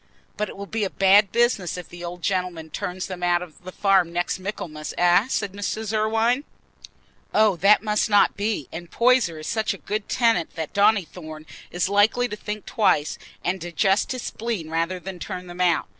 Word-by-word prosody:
"But 210 -2 -2
it - - -10
will 200 - -6
be 220 +1 -2
a 195 - 0
bad 195 +1 +4
business 235 -8 +1
if 180 - -7
the 175 0 -10
old 175 0 -7
gentleman 180 -4 -2
turns 180 +4 -4
them 185 -2 -7
out 175 0 +2
of 175 0 -14
the 185 - -8
farm 190 -3 +2
next 175 +1 -1
Michaelmas, 160 -6 -6
eh?" 175 +5 +4
said 200 -7 -2
Mrs. 215 +2 -3
Irwine. 225 +5 +1 0.9
"Oh, 215 -3 +5
that 200 +5 +5
must 210 +1 +1
not 205 -1 +4
be; 205 - -2
and 170 +1 -8
Poyser 235 -9 +3
is 155 - -8
such 220 +6 -1
a - - -11
good 210 0 -4
tenant 230 -9 +1
that 160 -2 -5
Donnithorne 180 -7 0 0.2
is 175 0 -1
likely 205 +5 +3
to 210 - -4
think 210 0 -6
twice, 185 -10 +1 0.3
and 180 +1 -1
digest 175 +4 +1
his 255 -2 -4
spleen 215 -9 -4
rather 170 +3 -1
than 185 0 -8
turn 180 0 -6
them 175 0 -7
out. 175 -3 +2
190 Hz, 190 wpm, -24 LUFS, 175-215 Hz, 0.9 s, Oh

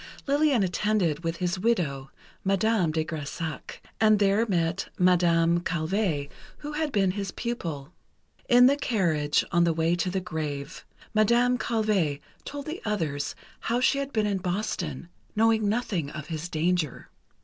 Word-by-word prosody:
Lillian 285 -5 +3
attended 180 -4 0
with 165 0 -1
his 180 0 -1
widow, 160 -12 0 0.3
Madame 195 -2 +2
de 160 0 -1
Grésac, 160 +1 -5 0.2
and 215 -1 +5
there 205 +3 +2
met 175 -1 0
Madame 170 -2 +4
Calvé, 170 -2 -1 0.3
who 295 0 -7
had 300 0 -1
been 195 -6 +2
his 195 0 -4
pupil. 170 - -5 0.6
In 245 0 +7
the 280 +2 +5
carriage 170 - +1
on 175 0 +4
the 170 -1 +3
way 165 +1 +1
to 175 +1 0
the 190 +1 -1
grave, 150 -3 -5 0.3
Madame 240 +3 +3
Calvé 205 -10 0 0.3
told 285 -1 -6
the 320 +4 -5
others 160 -10 -2 0.2
how 235 +1 0
she 270 +2 +3
had 280 0 -3
been 215 -4 +1
in 200 -2 0
Boston, 180 -5 -3 0.3
knowing 220 -1 +3
nothing 205 -9 -1
of 155 0 -8
his 165 +1 -4
danger. 165 -3 -1
185 Hz, 150 wpm, -27 LUFS, 165-220 Hz, 0.6 s, In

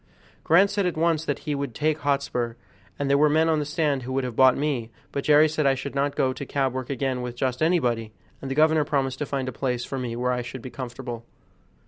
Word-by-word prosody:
Grant 190 +5 +5
said 200 -2 +1
at 175 - -3
once 160 -1 +1
that - - -1
he 150 - -1
would 140 -4 -4
take 155 0 0
Hotspur, 140 -5 -1 0.4
and 140 - -2
there 140 +1 +3
were 150 0 +5
men 160 +2 +3
on 160 -1 +2
the 150 - -2
stand 150 -2 0
who 125 +1 -6
would 135 0 0
have 125 -3 -4
bought 130 0 +5
me; 135 -6 -1 0.2
but 140 - -3
Jerry 150 +1 +6
said 155 -1 0
I 135 - +4
should 140 +2 -6
not 140 +1 0
go 130 -2 +1
to 135 - -6
cab 135 -1 -1
work 130 -1 -4
again 130 -1 -1
with 125 -1 -5
just 125 +1 -2
anybody, 125 -10 +1 0.3
and 135 - -5
the 135 - -2
governor 155 0 +4
promised 135 -2 -1
to 150 - -2
find 135 -2 -2
a - - -2
place 125 -1 -2
for 135 - -4
me 120 -2 -3
where 125 +1 0
I 125 0 -1
should 120 +1 -8
be 130 - -7
comfortable. 120 -2 -6
135 Hz, 255 wpm, -25 LUFS, 125-150 Hz, 0.4 s, Jerry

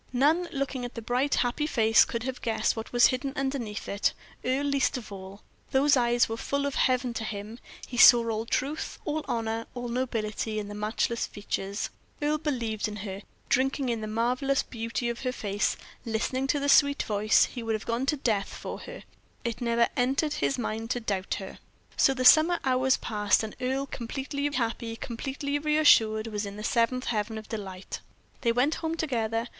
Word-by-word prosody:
None, 315 +7 +3
looking 275 -2 -2
at 245 - -6
the 230 - -5
bright, 250 +5 +1
happy 255 +5 0
face, 225 -5 +5
could 235 -1 -4
have 260 0 -4
guessed 220 -1 0
what 225 0 -6
was 240 0 +6
hidden 270 +1 -3
underneath 265 -6 -3
it 200 +1 0 0.3
Earle 260 +3 0
least 280 -2 +1
of 225 -4 -9
all. 195 +1 -9 0.3
Those 280 +2 +4
eyes 240 -1 +3
were 225 - -4
full 280 +4 -1
of 280 - -1
heaven 255 -2 +1
to 225 - -3
him; 215 +2 -6 0.3
he 245 - -7
saw 240 -1 +8
all 225 0 -2
truth, 285 +6 -2
all 310 0 -1
honor, 225 -1 -2
all 245 -1 -4
nobility 225 -3 -2
in 205 -1 -3
the - - -6
matchless 215 +3 -1
features. 200 0 -4 0.3
Earle 300 +1 0
believed 235 -9 -2
in 210 - -6
her; 195 0 -5 0.3
drinking 270 0 +1
in 230 -2 -1
the 215 - -4
marvelous 250 +5 +1
beauty 230 +1 -3
of 235 0 -3
her 255 - -1
face, 205 -4 -1 0.3
listening 240 +4 -1
to 290 - +1
the 285 - -1
sweet 285 0 +5
voice, 210 0 +3
he 245 - -7
would 225 -1 -1
have 215 - -5
gone 235 +3 -1
to 300 - +2
death 215 -7 0
for - - -6
her; - - -9 0.4
it 235 0 -3
never 235 0 +3
entered 275 +4 +1
his 275 -2 0
mind 225 -1 -3
to 245 - 0
doubt 195 -4 -2
her. 190 -1 -8 0.4
So 270 - +4
the 255 -1 -1
summer 315 +6 +7
hours 260 0 +3
passed, 210 -1 +1
and 215 - -6
Earle, 265 +2 0
completely 280 +3 -3
happy, 230 -3 -2
completely 270 +5 -3
reassured, 290 -8 +4
was 210 -2 -3
in 200 - -7
the 210 - -6
seventh 240 +3 +1
heaven 220 -1 -1
of 220 - -8
delight. 190 -4 -6 0.4
They 235 - +2
went 250 +6 +2
home 325 0 -2
together. 230 -6 -1
240 Hz, 190 wpm, -28 LUFS, 220-270 Hz, 0.4 s, saw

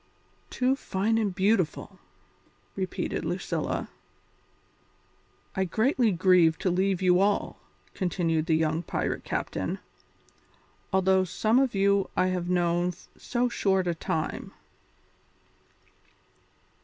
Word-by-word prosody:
"Too 260 +1 +1
fine 225 -2 0
and 205 -4 -1
beautiful!" 190 -3 0 0.8
repeated 190 -1 -3
Lucilla. - - -2 1.7
"I 190 - +1
greatly 230 - +2
grieve 175 -2 +4
to 185 - 0
leave 190 +1 0
you 180 -1 +4
all," 200 +1 0 0.3
continued 165 -4 -1
the 160 - +3
young 160 0 +1
pirate 175 - -3
captain, - - -3 1.1
"although 190 0 +3
some 215 +6 +1
of 265 -5 +1
you 200 0 +2
I 185 - +3
have 180 -1 -2
known 175 0 +1 0.2
so 245 0 -1
short 190 -5 +1
a 175 - 0
time. 160 -1 -3
185 Hz, 105 wpm, -27 LUFS, 175-200 Hz, 1.7 s, grieve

